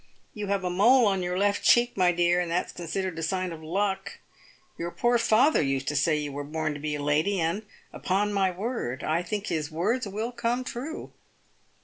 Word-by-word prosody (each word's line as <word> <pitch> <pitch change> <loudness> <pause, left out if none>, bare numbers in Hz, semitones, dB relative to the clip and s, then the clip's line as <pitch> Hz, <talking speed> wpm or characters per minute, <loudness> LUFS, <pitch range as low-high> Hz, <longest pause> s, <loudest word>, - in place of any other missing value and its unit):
You 210 -1 -5
have 200 -1 0
a 180 - -1
mole 235 +7 +5
on 195 -2 +1
your 180 0 -2
left 205 +1 +1
cheek, 240 0 +4
my 180 -2 +4
dear, 175 0 +2
and 175 -1 -1
that's 170 +2 -1
considered 175 0 -4
a - - -3
sign 185 +2 -1
of 160 - -10
luck. 190 +5 -2 0.6
Your 170 - -4
poor 240 +6 +1
father 230 +6 +4
used 135 -2 -1
to 145 - -3
say 150 +2 +2
you 145 -1 -3
were 145 +1 -5
born 155 +1 -2
to 145 - -7
be 150 0 -2
a 145 - -4
lady, 155 +7 +1
and, 170 +6 -1 0.3
upon 205 +3 0
my 195 -2 +2
word, 185 - -4
I 160 +2 +1
think 205 +3 -4
his 155 -3 -2
words 205 +9 -1
will 215 +4 -3
come 245 +1 -1
true." 260 +6 -6
185 Hz, 210 wpm, -27 LUFS, 160-210 Hz, 0.6 s, mole